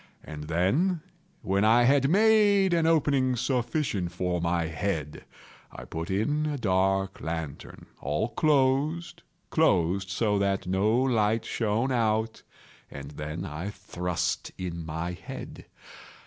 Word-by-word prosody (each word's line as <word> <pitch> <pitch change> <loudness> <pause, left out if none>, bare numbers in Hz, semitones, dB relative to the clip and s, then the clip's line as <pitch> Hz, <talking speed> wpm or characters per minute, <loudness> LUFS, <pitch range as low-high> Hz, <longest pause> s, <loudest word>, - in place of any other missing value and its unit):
And 75 -1 -8
then, 130 - +1 0.4
when 100 +1 +1
I 115 +3 +5
had 135 +2 +4
made 205 -1 +4
an 165 -1 +2
opening 140 -5 +2
sufficient 120 - -1
for 90 -1 -2
my 85 0 0
head, 80 -2 -3 0.5
I - - -9
put 80 +1 -5
in 145 +11 0
a 150 -1 -2
dark 95 -2 0
lantern, 80 -3 -6
all 75 - -1
closed, 150 +4 +1 0.3
closed, 95 - +1
that 100 -3 +1
no 95 +3 +1
light 115 -4 +1
shone 115 +4 0
out, 110 -2 0 0.5
and 70 +1 -8
then 75 +2 -5
I 80 +7 -5
thrust 90 -4 -3
in 85 -2 -5
my 80 +2 -4
head. 90 - -9
105 Hz, 120 wpm, -27 LUFS, 85-135 Hz, 0.5 s, I